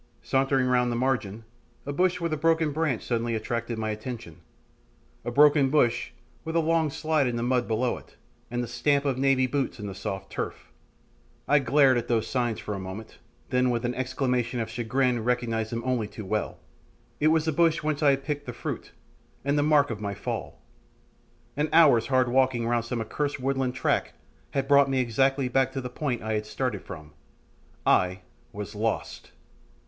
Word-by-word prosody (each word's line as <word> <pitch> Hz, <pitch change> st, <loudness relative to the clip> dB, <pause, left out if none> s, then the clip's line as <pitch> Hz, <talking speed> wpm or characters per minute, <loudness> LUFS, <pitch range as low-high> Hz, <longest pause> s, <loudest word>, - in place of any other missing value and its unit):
Sauntering 135 Hz, 0 st, +2 dB
round 125 Hz, -1 st, +2 dB
the -, -, -1 dB
margin, 115 Hz, -4 st, -1 dB, 0.4 s
a 145 Hz, -, -3 dB
bush 180 Hz, +3 st, +1 dB
with 170 Hz, -2 st, -1 dB
a -, -, +2 dB
broken 160 Hz, 0 st, +2 dB
branch 145 Hz, -6 st, -1 dB
suddenly 115 Hz, -1 st, -1 dB
attracted 115 Hz, +1 st, -3 dB
my 110 Hz, -1 st, -2 dB
attention 115 Hz, -1 st, -7 dB, 0.8 s
a -, -, -3 dB
broken 145 Hz, +1 st, +5 dB
bush 130 Hz, -5 st, +2 dB, 0.3 s
with 160 Hz, 0 st, -5 dB
a -, -, +4 dB
long 165 Hz, -1 st, +2 dB
slide 155 Hz, -1 st, 0 dB
in 120 Hz, -, -1 dB
the 120 Hz, -, -2 dB
mud 125 Hz, 0 st, +1 dB
below 120 Hz, +2 st, 0 dB
it, -, -, -21 dB, 0.3 s
and 120 Hz, 0 st, -2 dB
the -, -, -5 dB
stamp 140 Hz, +4 st, +1 dB
of 135 Hz, -2 st, 0 dB
Navy 135 Hz, -1 st, +3 dB
boots 135 Hz, -1 st, -2 dB
in 105 Hz, -, -6 dB
the 100 Hz, -, -5 dB
soft 95 Hz, 0 st, -5 dB
turf! -, -, -5 dB, 0.8 s
I 145 Hz, -, +5 dB
glared 135 Hz, -2 st, +4 dB
at -, -, -7 dB
those 115 Hz, -2 st, +1 dB
signs 120 Hz, -2 st, -1 dB
for 105 Hz, -, -5 dB
a 100 Hz, -, -4 dB
moment, 95 Hz, +4 st, -8 dB, 0.3 s
then 125 Hz, 0 st, +2 dB
with 120 Hz, 0 st, -1 dB
an 120 Hz, -, 0 dB
exclamation 125 Hz, -1 st, -1 dB
of 110 Hz, -1 st, -3 dB
chagrin 120 Hz, +1 st, 0 dB
recognised 115 Hz, -2 st, -1 dB
them 115 Hz, 0 st, -3 dB
only 125 Hz, -4 st, 0 dB
too 105 Hz, 0 st, -9 dB
well 105 Hz, +2 st, -2 dB, 0.6 s
it 150 Hz, -, +3 dB
was 160 Hz, 0 st, +3 dB
the 160 Hz, -, +1 dB
bush 165 Hz, +1 st, +2 dB
whence 155 Hz, 0 st, -1 dB
I 145 Hz, -, +5 dB
had 135 Hz, 0 st, +1 dB
picked 145 Hz, -1 st, -4 dB
the 125 Hz, -, -4 dB
fruit, -, -, -6 dB, 0.5 s
and 140 Hz, +1 st, +2 dB
the 145 Hz, -, +3 dB
mark 145 Hz, -2 st, +3 dB
of 105 Hz, -2 st, -5 dB
my 100 Hz, -1 st, -3 dB
fall. -, -, -5 dB, 1.0 s
An 150 Hz, +2 st, 0 dB
hour's 145 Hz, -9 st, +6 dB
hard 130 Hz, -2 st, +3 dB
walking 130 Hz, -1 st, +2 dB
round 120 Hz, -1 st, +1 dB
some 115 Hz, -1 st, -3 dB
accursed 145 Hz, +6 st, -2 dB
woodland 130 Hz, -1 st, -1 dB
track -, -, 0 dB, 0.4 s
had 135 Hz, -1 st, -2 dB
brought 140 Hz, -1 st, +5 dB
me 135 Hz, -1 st, +1 dB
exactly 135 Hz, +3 st, +1 dB
back 130 Hz, +1 st, +2 dB
to 135 Hz, -, -2 dB
the 125 Hz, -1 st, -5 dB
point 125 Hz, -4 st, -2 dB
I 110 Hz, 0 st, -2 dB
had 105 Hz, 0 st, -2 dB
started 125 Hz, -4 st, -2 dB
from 75 Hz, -3 st, -10 dB, 0.7 s
I 90 Hz, 0 st, +3 dB, 0.3 s
was 105 Hz, +1 st, -6 dB
lost! 110 Hz, +1 st, -3 dB
125 Hz, 190 wpm, -27 LUFS, 115-140 Hz, 1.0 s, hour's